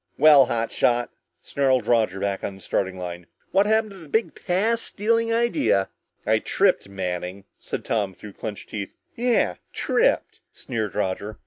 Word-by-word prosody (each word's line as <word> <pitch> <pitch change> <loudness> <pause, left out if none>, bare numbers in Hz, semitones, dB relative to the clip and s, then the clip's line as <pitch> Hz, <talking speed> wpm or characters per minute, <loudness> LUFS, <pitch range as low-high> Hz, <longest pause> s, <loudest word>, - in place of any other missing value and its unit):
"Well, 145 -4 +7
hot 115 -1 -1
shot," 120 0 +1 0.3
snarled 130 -4 +1
Roger 110 -5 +2
back 100 0 -2
on 100 - -3
the 95 - -15
starting 95 -1 -1
line, 90 -1 -6 0.2
"what 195 +2 +4
happened 220 0 +2
to 195 - -11
the 165 -5 -13
big 220 +6 +1
pass 215 +6 0
stealing 230 +2 0
idea?" 230 - +2 0.4
"I - - +3
tripped, - - +1
Manning," 90 0 -4
said - - -5
Tom 100 -4 -1
through 105 -2 -11
clenched 105 0 -7
teeth. 100 -3 -5 0.2
"Yeah! 235 - +1 0.2
Tripped!" - - +1
sneered 110 -4 -4
Roger. 100 +3 -2
115 Hz, 155 wpm, -24 LUFS, -, 0.4 s, Well